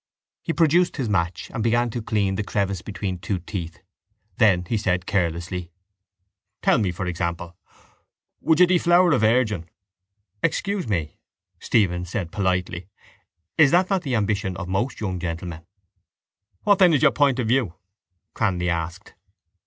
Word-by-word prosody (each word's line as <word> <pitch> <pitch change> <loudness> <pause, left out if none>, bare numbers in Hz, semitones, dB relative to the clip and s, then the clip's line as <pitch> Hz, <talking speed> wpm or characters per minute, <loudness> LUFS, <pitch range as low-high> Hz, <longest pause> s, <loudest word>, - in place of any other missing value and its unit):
He 165 - -2
produced 170 +2 +2
his 130 -5 -1
match 85 -4 -1
and - - -3
began 120 +1 +1
to 120 - -4
clean 105 -3 0
the 100 - -2
crevice 100 -3 -2
between 95 -3 -4
two 100 +1 -2
teeth. 85 -2 -6 0.6
Then 95 -6 +4
he 115 - -2
said 90 -4 0
carelessly: 90 -2 -2 0.9
—Tell - - +4
me, 100 -4 0
for 90 +2 -5
example, 85 0 -3 0.8
would 160 0 +2
you 180 - +8
deflower 175 0 +4
a 130 - +3
virgin? 110 -6 +1 0.7
—Excuse 200 -7 -1
me, 85 -8 -2 0.4
Stephen 90 -5 +1
said 85 -1 -4
politely, 90 -2 -1 0.7
is 150 -3 +7
that 180 +4 +3
not 190 -2 +2
the 135 -6 -2
ambition 100 -4 -1
of 95 - -5
most 100 +8 -2
young 95 -4 -3
gentlemen? 85 -1 -5 1.0
—What 205 -1 +4
then 180 -3 +6
is 145 - +1
your 150 - +6
point 140 -3 +2
of 125 -4 -1
view? 115 -8 +1 0.6
Cranly 90 -5 0
asked. 85 0 -4
100 Hz, 150 wpm, -23 LUFS, 90-125 Hz, 1.0 s, you